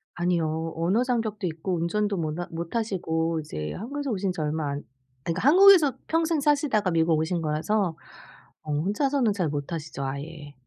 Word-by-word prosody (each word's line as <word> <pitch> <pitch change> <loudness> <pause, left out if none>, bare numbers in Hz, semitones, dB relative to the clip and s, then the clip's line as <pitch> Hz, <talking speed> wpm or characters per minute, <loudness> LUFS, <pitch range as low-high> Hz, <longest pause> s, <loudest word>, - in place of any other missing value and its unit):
아니요. 165 -2 -1
언어 180 +9 +1
장벽도 220 -6 -1
있고 165 +3 -3
운전도 200 +5 0
모나 165 +1 -3
못하시고 165 -3 -2
이제 75 - -5
한국에서 275 +5 -4
오신 195 -2 -1
지 180 - -4
얼마 150 0 -1
안 140 +1 -4 0.4
그러니까 180 +10 -1
한국에서 365 -4 +7
평생 325 -1 +1
사시다가 280 -9 +2
미국 165 -1 +3
오신 165 +2 -1
거라서 165 +4 0 0.7
어 155 - -5
혼자서는 220 - +1
잘 180 -6 -1
못하시죠, 150 0 -4
아예. 145 +2 -6
175 Hz, 360 characters per minute, -26 LUFS, 160-220 Hz, 0.7 s, 한국에서